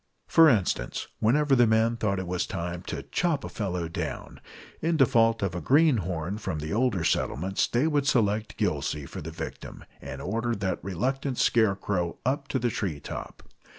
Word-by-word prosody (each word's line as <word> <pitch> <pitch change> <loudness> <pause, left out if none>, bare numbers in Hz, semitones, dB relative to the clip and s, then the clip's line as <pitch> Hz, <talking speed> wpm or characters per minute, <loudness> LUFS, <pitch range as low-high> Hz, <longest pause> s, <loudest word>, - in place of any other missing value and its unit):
For 165 -1 +6
instance, 95 - 0
whenever 140 +5 +3
the 120 -2 +5
men 110 +1 +3
thought 105 -4 -1
it 95 - -3
was 90 0 -2
time 85 -1 -4
to - - -4
"chop 165 -6 0
a - - -5
fellow 90 -5 -3
down," 85 -4 -5 0.4
in 165 0 +1
default 115 -5 +4
of 95 -4 -1
a 90 - -4
greenhorn 105 - +2
from 80 - -3
the 75 +1 -4
older 115 -6 +1
settlements 95 +4 0
they 120 +5 +1
would 145 -3 +1
select 110 -3 +1
Gillsey 75 -2 -1
for - - -8
the 75 - -6
victim, 80 0 -8 0.2
and - - -7
order 115 +4 -1
that 95 -2 -2
reluctant 130 - -2
scarecrow 100 -5 +1
up 140 +2 0
to 140 - -1
the 120 -2 0
tree 90 -10 -3
top. - - -8
110 Hz, 175 wpm, -27 LUFS, 90-130 Hz, 0.4 s, For